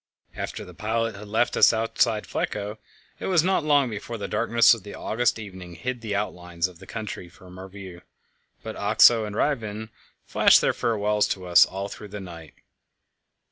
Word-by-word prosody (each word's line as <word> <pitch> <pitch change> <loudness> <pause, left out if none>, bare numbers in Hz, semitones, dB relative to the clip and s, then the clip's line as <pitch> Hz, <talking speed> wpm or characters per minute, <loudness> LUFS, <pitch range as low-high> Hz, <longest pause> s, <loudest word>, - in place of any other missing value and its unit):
After - - -5
the - - -12
pilot 115 +1 -2
had 105 +2 -10
left 115 +3 +1
us - - +6
outside 115 -1 0
Flekkerö, 105 0 -3 0.4
it - - -4
was 175 -4 +3
not 185 -2 +1
long 145 -3 +3
before 110 +2 -6
the 100 -2 -5
darkness 115 +2 +4
of 115 - -5
the 100 +1 -10
August 120 +2 0
evening 95 -5 -9
hid 125 +7 -4
the 105 -3 -3
outlines 90 -4 -2
of 90 -2 -16
the 95 - -14
country 105 -5 -6
from 90 0 -15
our 95 +1 -9
view; 95 -3 -10 0.6
but - - -6
Oxö 115 -3 +5
and 105 - -7
Ryvingen 110 -6 -2 0.4
flashed - - +5
their - - +1
farewells 105 -3 0
to 95 -2 -4
us 90 -1 +6
all 95 +1 -5
through 105 - -9
the 105 +1 -8
night. 85 -4 -11
105 Hz, 180 wpm, -25 LUFS, 95-115 Hz, 0.6 s, us